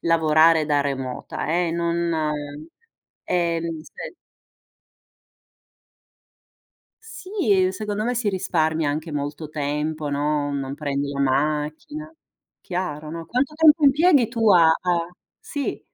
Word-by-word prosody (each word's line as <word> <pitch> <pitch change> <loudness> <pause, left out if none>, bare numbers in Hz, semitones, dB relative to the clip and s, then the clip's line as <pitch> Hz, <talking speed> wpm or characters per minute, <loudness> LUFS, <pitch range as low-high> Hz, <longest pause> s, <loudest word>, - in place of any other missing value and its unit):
lavorare 160 -1 +4
da 145 -1 +2
remota 135 -3 -4
eh, 170 +1 +1
non 170 0 -1 1.1
ehm, 170 -2 -1
se - - -10 2.9
Sì, 370 - 0
secondo 210 +1 -3
me 245 +3 -1
si 230 -3 0
risparmia 160 -5 0
anche 155 +2 -4
molto 145 +2 -4
tempo, 150 +1 -3
no, 145 0 0
non 135 -1 -3
prendi 140 -1 -2
la 140 - -3
macchina. 150 - -1 0.5
Chiaro, 155 -4 -4
no. 165 +1 -6
Quanto 255 - -1
tempo 310 -1 +5
impieghi 285 -2 +5
tu 230 -2 +2
a 175 -4 +7
a 170 +1 +1 0.3
sì. 285 -1 -4
165 Hz, 110 wpm, -23 LUFS, 150-205 Hz, 2.9 s, a